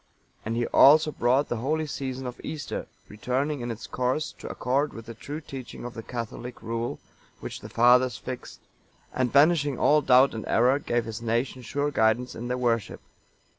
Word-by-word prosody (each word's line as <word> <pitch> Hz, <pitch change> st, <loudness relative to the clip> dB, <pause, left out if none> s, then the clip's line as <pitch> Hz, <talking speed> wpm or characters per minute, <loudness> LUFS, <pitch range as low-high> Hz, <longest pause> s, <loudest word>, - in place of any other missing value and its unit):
And 115 Hz, +1 st, -3 dB
he 120 Hz, 0 st, 0 dB
also 155 Hz, +5 st, +6 dB
brought 130 Hz, +2 st, +2 dB
the 120 Hz, -, -2 dB
holy 155 Hz, +7 st, -1 dB
season 135 Hz, -3 st, -5 dB
of 125 Hz, -1 st, -7 dB
Easter, 150 Hz, -4 st, -5 dB, 0.2 s
returning 130 Hz, +6 st, -2 dB
in 120 Hz, -, -4 dB
its 115 Hz, +1 st, -6 dB
course, 130 Hz, +5 st, -1 dB
to -, -, -7 dB
accord 140 Hz, +4 st, 0 dB
with 115 Hz, 0 st, -9 dB
the 115 Hz, -, -8 dB
true 145 Hz, +7 st, -7 dB
teaching 130 Hz, -5 st, -8 dB
of 120 Hz, -, -6 dB
the 115 Hz, -, -6 dB
catholic 120 Hz, +1 st, -7 dB
rule 115 Hz, +1 st, -3 dB, 0.4 s
which -, -, -7 dB
the -, -, -10 dB
Fathers 125 Hz, +1 st, +4 dB
fixed, 130 Hz, -1 st, -8 dB, 0.5 s
and, 125 Hz, -2 st, 0 dB
banishing 145 Hz, -2 st, +4 dB
all 150 Hz, 0 st, +4 dB
doubt 130 Hz, 0 st, +5 dB
and 110 Hz, -2 st, -6 dB
error, 125 Hz, +4 st, +3 dB
gave 120 Hz, -4 st, -1 dB
his 115 Hz, 0 st, -6 dB
nation 120 Hz, +3 st, -1 dB
sure 145 Hz, +3 st, -2 dB
guidance 110 Hz, 0 st, +1 dB
in 120 Hz, +2 st, -6 dB
their 125 Hz, +1 st, -1 dB
worship. 115 Hz, -4 st, -1 dB
125 Hz, 180 wpm, -26 LUFS, 115-140 Hz, 0.5 s, also